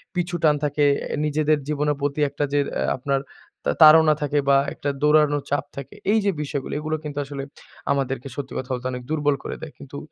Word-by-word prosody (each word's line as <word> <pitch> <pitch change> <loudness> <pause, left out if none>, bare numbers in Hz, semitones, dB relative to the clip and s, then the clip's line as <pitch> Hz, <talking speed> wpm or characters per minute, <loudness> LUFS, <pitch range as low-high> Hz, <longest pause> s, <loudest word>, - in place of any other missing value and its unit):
পিছুটান 170 -4 +1
থাকে, 145 0 +1 0.2
অ্যা - - -3
নিজেদের 150 0 +1
জীবনের 150 0 0
প্রতি 145 +1 -1
একটা 145 +1 -3
যের 145 -1 +2 0.2
আ - - +1
আপনার 135 +1 0 0.5
তা 70 - +2
তাড়না 155 0 +8
থাকে 145 0 +1
বা 140 - +6 0.2
একটা 145 - -3
দৌড়ানোর 150 -1 +3
চাপ 145 - 0
থাকে। 140 -1 -8 0.2
এই 220 - +4
যে 200 - +3
বিষয় 140 -1 -3
গুলি - - -6
এইগুলো 155 +1 -2
কিন্তু 145 -1 -6
আসলে 140 -1 -6 0.5
আমাদেরকে 135 -1 -1
সত্যি 140 -2 -6
কথা 130 0 -5
বলতে 125 0 -3
অনেক 125 0 -6
দুর্বল 145 -2 +1
করে - - -5
দেয়। 160 - -7
কিন্তু 140 0 -10
145 Hz, 200 wpm, -23 LUFS, 140-150 Hz, 0.5 s, তাড়না